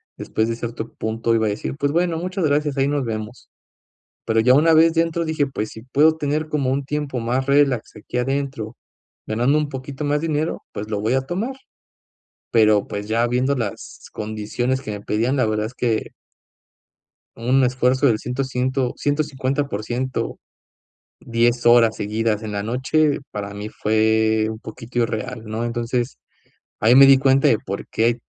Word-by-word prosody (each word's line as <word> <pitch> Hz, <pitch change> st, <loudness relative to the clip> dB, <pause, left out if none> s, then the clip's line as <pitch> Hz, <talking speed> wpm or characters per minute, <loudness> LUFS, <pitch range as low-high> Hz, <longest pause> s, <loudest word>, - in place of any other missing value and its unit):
después 110 Hz, -, -1 dB
de 115 Hz, -, -2 dB
cierto 115 Hz, -1 st, -6 dB
punto 115 Hz, +1 st, -1 dB
iba 110 Hz, -1 st, +2 dB
a -, -, +1 dB
decir: 105 Hz, +5 st, -4 dB
"Pues 145 Hz, -1 st, 0 dB
bueno, 170 Hz, 0 st, +1 dB
muchas 185 Hz, +1 st, -2 dB
gracias, 145 Hz, -1 st, +1 dB
ahí 135 Hz, 0 st, +2 dB
nos 145 Hz, -1 st, 0 dB
vemos", 110 Hz, 0 st, -6 dB, 0.8 s
pero 110 Hz, 0 st, +2 dB
ya 125 Hz, +3 st, +5 dB
una 160 Hz, +4 st, +5 dB
vez 165 Hz, +1 st, +5 dB
dentro 165 Hz, 0 st, +1 dB
dije: 155 Hz, -3 st, 0 dB
"Pues 110 Hz, -6 st, -4 dB
si 110 Hz, -, -10 dB
puedo 145 Hz, +6 st, +3 dB
tener 150 Hz, +1 st, -1 dB
como 140 Hz, -4 st, 0 dB
un 140 Hz, +1 st, -1 dB
tiempo 145 Hz, -3 st, -3 dB
más 125 Hz, +3 st, -1 dB
relax 140 Hz, -4 st, +2 dB
aquí 105 Hz, +3 st, -5 dB
adentro, 135 Hz, -3 st, -2 dB, 0.5 s
ganando 120 Hz, +7 st, +2 dB
un 150 Hz, -1 st, -1 dB
poquito 135 Hz, +1 st, -6 dB
más 145 Hz, 0 st, +1 dB
dinero, 155 Hz, 0 st, -2 dB
pues 105 Hz, +1 st, -6 dB
lo 105 Hz, -2 st, -1 dB
voy 110 Hz, +3 st, 0 dB
a 130 Hz, -, +3 dB
tomar", 190 Hz, -, -3 dB, 1.0 s
pero, 110 Hz, -3 st, +4 dB
pues 105 Hz, 0 st, -5 dB
ya 115 Hz, +2 st, +1 dB
viendo 125 Hz, +3 st, +1 dB
las 115 Hz, -6 st, -6 dB
condiciones 110 Hz, +5 st, -2 dB
que 110 Hz, -, -8 dB
me 105 Hz, -1 st, -6 dB
pedían, 115 Hz, +6 st, 0 dB
la 130 Hz, -4 st, +2 dB
verdad 110 Hz, 0 st, -1 dB
es 125 Hz, -, -13 dB
que 115 Hz, -3 st, -1 dB, 1.2 s
un 130 Hz, +3 st, +2 dB
esfuerzo 130 Hz, +2 st, +2 dB
del 115 Hz, -5 st, +3 dB
ciento 125 Hz, +4 st, -3 dB
ciento 130 Hz, 0 st, -1 dB
150%, 135 Hz, -4 st, -2 dB, 0.8 s
10 120 Hz, +1 st, +1 dB
horas 120 Hz, -2 st, +6 dB
seguidas 110 Hz, +1 st, -1 dB
en 110 Hz, -1 st, -5 dB
la 100 Hz, 0 st, -2 dB
noche, 135 Hz, +6 st, +1 dB
para 100 Hz, -1 st, -5 dB
mí 105 Hz, +1 st, -5 dB
fue 110 Hz, 0 st, +2 dB
un 110 Hz, -, -6 dB
poquito 115 Hz, +2 st, -7 dB
irreal, 115 Hz, +1 st, -3 dB
¿no?, 110 Hz, +1 st, -4 dB
entonces 120 Hz, +1 st, -2 dB, 0.6 s
ahí 110 Hz, +3 st, +5 dB
me 135 Hz, +1 st, +9 dB
di 135 Hz, 0 st, +7 dB
cuenta 135 Hz, 0 st, +4 dB
de 110 Hz, -, +3 dB
por 100 Hz, +1 st, -6 dB
qué 110 Hz, -, 0 dB
hay 120 Hz, 0 st, +1 dB
125 Hz, 175 wpm, -21 LUFS, 110-140 Hz, 1.2 s, me